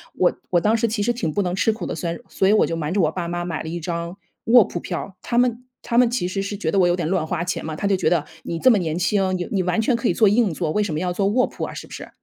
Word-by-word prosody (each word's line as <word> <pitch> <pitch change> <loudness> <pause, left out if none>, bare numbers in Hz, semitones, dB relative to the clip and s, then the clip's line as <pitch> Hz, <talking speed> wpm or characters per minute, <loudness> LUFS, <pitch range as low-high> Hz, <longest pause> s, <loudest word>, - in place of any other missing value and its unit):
我 180 - +3 0.2
我 175 - +4
当 215 +5 +3
时 230 - +1
其 220 -1 -2
实 230 +4 +2
挺 170 -10 -2
不 205 - +1
能 180 -2 -1
吃 210 +3 +2
苦 220 - -8
的， - - -3
所 170 - -3
以 - - -8
所 190 - +1
以 205 - +5
我 215 - +5
就 165 - -2
瞒 160 0 -3
着 200 - +2
我 155 -2 +2
爸 175 0 -4
妈 175 0 -3
买 170 -2 -4
了 160 - -6
一 170 +1 -4
张 170 +2 -4 0.3
卧 235 0 +7
铺 175 - -5
票。 185 +2 -6
他 235 - -2
们 245 -1 +1 0.2
他 235 - -2
们 245 -1 +5
其 200 -8 -1
实 195 +2 -2
是 200 +1 -4
觉 160 - -2
得 - - 0
我 180 - +5
有 175 - +2
点 175 -3 -2
乱 180 -2 0
花 170 +1 -2
钱 180 - -3
嘛， 155 -1 -4
他 200 - -2
就 200 - +3
觉 185 - -1
得 170 -4 +2 0.2
你 165 - -4
这 260 - +5
么 225 - +4
年 165 -4 -2
轻， 190 0 +1
你 175 - -4
你 195 -3 +1
完 180 +4 +1
全 240 +3 +2
可 235 +1 -1
以 - - +2
坐 215 -3 +4
硬 210 -3 +2
座， 160 0 -2
为 210 +5 +1
什 195 -6 -3
么 150 - -1
要 180 +1 -1
坐 195 +2 0
卧 245 +5 +2
铺 - - -7
啊， - - -4
是 - - -8
不 - - -13
是？ - - -8
185 Hz, 370 characters per minute, -22 LUFS, 170-210 Hz, 0.3 s, 卧